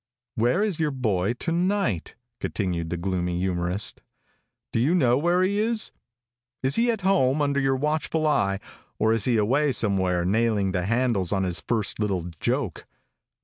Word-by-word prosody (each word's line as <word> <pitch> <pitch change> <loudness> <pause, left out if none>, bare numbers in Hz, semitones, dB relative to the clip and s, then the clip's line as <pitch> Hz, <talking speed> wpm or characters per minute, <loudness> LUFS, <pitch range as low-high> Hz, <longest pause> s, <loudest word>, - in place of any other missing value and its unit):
"Where 120 - +2
is 200 -7 -1
your 155 -2 +1
boy 110 -7 0
to 165 +7 -4
night?" 175 - 0 0.2
continued 85 -5 -2
the 85 - -2
gloomy 90 -1 -2
humorist. 90 +2 -1 0.7
"Do - - +1
you 145 +9 +3
know 125 -8 +4
where 175 +6 +2
he 200 +2 +1
is? 225 0 +1 0.7
Is 130 +1 +1
he 235 +1 +2
at 225 -3 0
home 155 -8 +2
under 140 -1 +1
your 135 -1 +2
watchful 155 +3 -1
eye, 100 -10 +2 0.4
or 110 +1 +2
is 115 -3 +1
he 120 -3 +2
away 135 +8 +2
somewhere 95 -6 +1
nailing 105 -1 +1
the 90 -1 -1
handles 115 -6 +1
on 95 -2 +1
his 90 -2 0
first 110 -4 -2
little 100 -4 0 0.2
joke? 125 - -2
115 Hz, 165 wpm, -25 LUFS, 95-150 Hz, 0.7 s, know